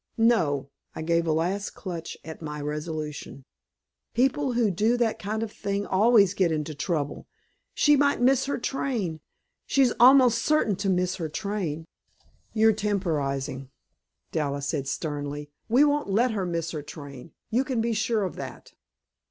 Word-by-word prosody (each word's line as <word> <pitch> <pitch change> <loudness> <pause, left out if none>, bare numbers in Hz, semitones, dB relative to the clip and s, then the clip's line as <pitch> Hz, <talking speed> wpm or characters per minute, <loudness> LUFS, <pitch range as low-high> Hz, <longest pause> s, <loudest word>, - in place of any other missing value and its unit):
"No!" 165 - +2 0.2
I 160 - -4
gave 170 +1 +1
a - - +2
last 180 +6 -1
clutch 175 -4 -6
at 160 +1 -8
my 150 -1 -5
resolution. 150 -2 -5 0.7
"People 265 +2 +2
who 235 -4 +2
do 220 +7 +2
that 235 -2 0
kind 215 +2 -2
of 220 - -5
thing 200 -1 -3
always 205 -1 +4
get 185 -4 +2
into 155 0 -2
trouble. 145 -1 -3 0.5
She 295 -1 +5
might 285 0 +2
miss 260 +1 +3
her 285 - -1
train. 235 -10 -2 0.5
She's 265 -3 +3
almost 250 -1 +7
certain 300 -10 +2
to 200 0 -1
miss 180 0 +1
her 165 -4 -3
train." 170 -4 -3 0.7
"You're 220 0 +4
temporizing," 145 -11 -2 0.6
Dallas 140 -3 -1
said 140 -4 -2
sternly. 145 -1 -4 0.2
"We 250 +6 +5
won't 295 -4 +1
let 230 +5 +2
her 195 -4 -2
miss 170 -1 -2
her 155 - -4
train; 145 0 -10 0.2
you 245 +4 +2
can 260 -3 -2
be 230 +1 0
sure 220 0 0
of 185 - -3
that." - - -8
190 Hz, 155 wpm, -26 LUFS, 155-230 Hz, 0.7 s, almost